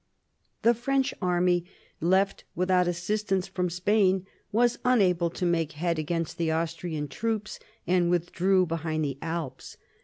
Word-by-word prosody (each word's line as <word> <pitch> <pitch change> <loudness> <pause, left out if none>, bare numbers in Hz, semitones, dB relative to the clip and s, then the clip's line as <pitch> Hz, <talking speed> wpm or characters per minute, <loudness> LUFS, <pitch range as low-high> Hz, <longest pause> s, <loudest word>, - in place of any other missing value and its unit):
The 235 +2 +6
French 265 +3 0
army, 180 -1 +2 0.4
left 190 +4 +2
without 180 0 +2
assistance 190 +2 -1
from 180 -2 -1
Spain, 190 +1 +2 0.3
was 240 +2 +2
unable 185 -9 +3
to 180 - -3
make 165 -2 0
head 165 +2 -1
against 165 +1 -2
the 165 -1 +1
Austrian 160 -1 -2
troops, 215 +6 -3 0.3
and 175 -1 +2
withdrew 180 +2 +2
behind 160 -2 -2
the 140 -1 -4
Alps. 160 -6 -5
180 Hz, 130 wpm, -27 LUFS, 165-195 Hz, 0.4 s, The